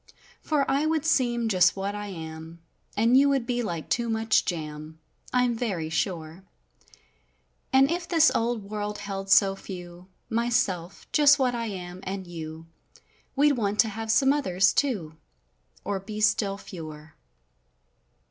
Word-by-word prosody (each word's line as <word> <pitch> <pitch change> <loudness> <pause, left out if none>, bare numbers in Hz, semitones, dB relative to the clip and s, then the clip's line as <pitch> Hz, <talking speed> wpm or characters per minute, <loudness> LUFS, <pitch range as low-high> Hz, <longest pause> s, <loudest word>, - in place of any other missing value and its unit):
For 295 -3 +1
I 285 +3 +1
would 320 -1 0
seem 240 -7 +2
just 185 -4 +4
what 195 +1 -3
I 205 0 -5
am, 160 -2 -8 0.4
and 230 +4 +4
you 280 +2 +6
would 270 -4 +1
be 245 0 -1
like 170 -8 -4
too 235 -1 0
much 225 0 +2
jam 155 -2 -5 0.3
I'm 250 -1 +2
very 190 -9 -3
sure; 165 0 -3 1.3
And 270 +2 +5
if 345 0 -2
this 325 -2 +5
old 230 -1 -1
world 210 +1 -4
held 195 -1 -6
so 195 0 +5
few—my¬ 185 +6 -6
self, 180 -6 -1
just 290 -1 +6
what 255 -3 +1
I 230 -1 -2
am, 180 -3 -7
and 190 0 -5
you, 160 -2 -8 0.7
We'd 290 +2 +4
want 210 -6 -1
to 225 - -1
have 220 +1 -6
some 270 +4 +4
others, 190 -10 +2
too. 190 - -1 0.7
Or 200 -1 -1
be 210 +2 -7
still 205 -2 +2
fewer. 155 -5 -10
205 Hz, 150 wpm, -26 LUFS, 175-245 Hz, 1.3 s, you